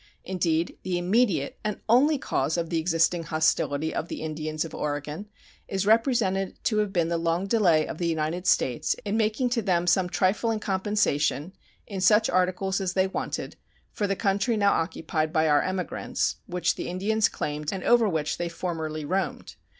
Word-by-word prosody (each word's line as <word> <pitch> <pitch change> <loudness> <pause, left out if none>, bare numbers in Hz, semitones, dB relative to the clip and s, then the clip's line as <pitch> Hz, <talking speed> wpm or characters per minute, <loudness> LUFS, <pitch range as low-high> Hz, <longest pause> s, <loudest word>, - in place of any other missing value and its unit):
Indeed, 170 -2 -1
the 180 -1 -2
immediate 185 - +1
and 210 -1 -2
only 275 +7 +4
cause 155 - -1
of 170 0 -2
the 165 - +1
existing 165 +1 +2
hostility 155 -1 0
of 160 - -3
the - - -6
Indians 155 0 -3
of 165 - -9
Oregon 150 +6 -4 0.4
is 195 0 -2
represented 215 -4 +2
to 215 - +1
have 210 -2 +1
been 170 -4 +1
the 170 -1 0
long 170 +3 0
delay 190 -8 +3
of 160 - -6
the 170 - 0
United 165 +3 -2
States 130 +4 +2
in 205 +1 -1
making 225 +3 +1
to 240 -2 +1
them 180 -4 +1
some 180 +1 +2
trifling 195 +5 +1
compensation, 190 -6 0 0.3
in 195 -3 -5
such 210 +4 +4
articles 185 +2 +1
as 185 -1 -1
they 190 0 +3
wanted, 190 - -4 0.3
for 205 - -1
the 195 - 0
country 200 +3 +1
now 200 -1 +4
occupied 160 -1 -1
by 160 0 +2
our 145 -1 +4
emigrants, 185 -3 -2
which 180 0 0
the - - -5
Indians 205 +5 +1
claimed 150 0 -3
and 190 -2 -4
over 235 -3 +4
which 150 -3 -2
they 175 0 -2
formerly 160 -3 -4
roamed. 190 +5 -3
180 Hz, 175 wpm, -26 LUFS, 160-200 Hz, 0.4 s, only